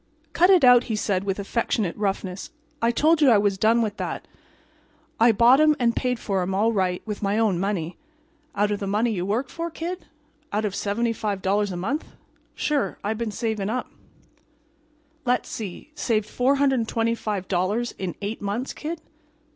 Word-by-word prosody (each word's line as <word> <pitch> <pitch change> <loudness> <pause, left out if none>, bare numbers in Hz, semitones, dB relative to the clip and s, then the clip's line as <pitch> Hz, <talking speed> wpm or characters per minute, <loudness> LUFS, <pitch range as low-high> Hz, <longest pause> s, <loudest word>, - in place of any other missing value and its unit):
"Cut 360 +2 +4
it 370 -5 +6
out," 245 -1 +7
he 225 - -2
said, 195 -2 -1
with 195 -1 -1
affectionate 205 -2 -1
roughness. 195 -2 -3 0.3
"I 230 - +3
told 310 +7 +3
you 285 - +6
I 225 - +6
was 200 -1 +1
done 230 +2 +4
with 210 -2 -3
that. - - -4 0.9
I 230 +1 +6
bought 240 +5 +5
'em 305 0 +5
and 235 -1 +2
paid 250 -1 0
for 195 -4 -1
'em, 185 +1 -2
all 220 +4 +2
right, 185 -3 0
with 210 -2 -5
my 200 +1 0
own 215 -6 +2
money." 185 -4 -2 0.6
"Out 205 +1 +1
of 205 - -1
the 200 - -3
money 215 +4 +1
you 185 -3 -2
worked 240 +6 -1
for, 335 0 -4
Kid? 345 +3 -6 0.4
Out 215 +1 0
of 205 - -2
$75 205 -2 -1
a 180 - -4
month?" 235 - -3 0.4
"Sure. 295 -2 -1
I 205 +2 0
been 225 0 -3
saving 215 -1 -2
up." 250 +3 -3 1.3
"Let's 250 -1 0
see—saved 220 - -3
$425 230 -6 0
in 185 -3 -3
eight 210 +3 -4
months, 205 +6 -3
Kid?" 320 +1 -5
220 Hz, 165 wpm, -24 LUFS, 200-245 Hz, 1.3 s, out